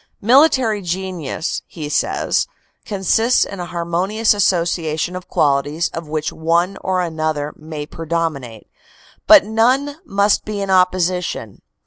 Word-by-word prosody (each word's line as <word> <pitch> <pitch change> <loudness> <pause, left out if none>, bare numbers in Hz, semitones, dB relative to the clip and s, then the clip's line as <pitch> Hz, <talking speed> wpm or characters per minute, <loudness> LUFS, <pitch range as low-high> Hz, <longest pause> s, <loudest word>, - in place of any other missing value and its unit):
"Military 250 -3 +4
genius," 180 -3 -4
he 155 -3 -7
says, 150 - 0 0.4
"consists 225 +4 +2
in 200 - -8
a 175 - -5
harmonious 175 +6 0
association 170 -3 0
of 185 -1 -7
qualities 145 +3 +1
of 165 -1 -7
which 155 0 -3
one 170 +4 0
or 185 -1 0
another 155 -3 -2
may 155 -1 -7
predominate, 160 -8 -4 0.6
but 315 -6 +8
none 255 +7 +1
must 200 +1 +1
be 210 -1 -5
in 195 -1 -3
opposi 180 -1 +2
tion. 110 - -6
175 Hz, 125 wpm, -19 LUFS, 160-200 Hz, 0.6 s, but